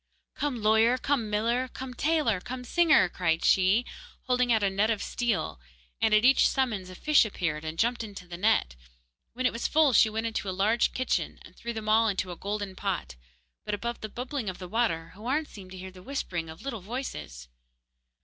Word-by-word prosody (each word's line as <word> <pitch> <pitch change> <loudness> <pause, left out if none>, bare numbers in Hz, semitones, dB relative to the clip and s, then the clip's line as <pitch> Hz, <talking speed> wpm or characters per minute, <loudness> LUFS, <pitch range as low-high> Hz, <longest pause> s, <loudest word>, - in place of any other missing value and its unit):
'Come 255 -7 -3
lawyer, 220 +3 +4
come 255 -5 0
miller, 230 +5 0
come 255 0 -7
tailor, 290 - +1
come 250 +3 -6
singer!' 315 - +4
cried 165 -2 0
she, 195 +6 +4 0.4
holding 250 -1 +1
out 220 -2 +3
a 200 - +3
net 205 +3 +1
of 220 -2 +1
steel; 235 - -1 0.4
and 225 - +3
at 215 +2 +5
each 270 +1 +6
summons 220 -9 -1
a 185 - -9
fish 305 +9 +4
appeared 170 -8 -3
and 160 +1 -5
jumped 235 +4 +1
into 200 -4 -9
the 175 - -7
net. 180 - +2 0.6
When 255 +2 -3
it - - +2
was 230 - -1
full 310 -4 +4
she 220 - +6
went 220 +1 -3
into 220 -3 -2
a 185 - -4
large 215 +4 +2
kitchen 255 - -1
and - - -15
threw 235 - -5
them 220 -2 -6
all 225 +1 +4
into 190 -3 -1
a - - -6
golden 200 0 -4
pot; 185 - -3 0.5
but 210 - -2
above 235 +3 -5
the 215 - -5
bubbling 250 0 -4
of 185 - -6
the 180 - -8
water 175 -6 -1
Houarn 255 +10 -1
seemed 195 -9 -12
to 185 - -9
hear 185 +1 -8
the 185 0 -14
whispering 180 -9 -4
of 160 - -11
little 250 -7 -4
voices. 75 - -6
220 Hz, 205 wpm, -28 LUFS, 185-245 Hz, 0.6 s, each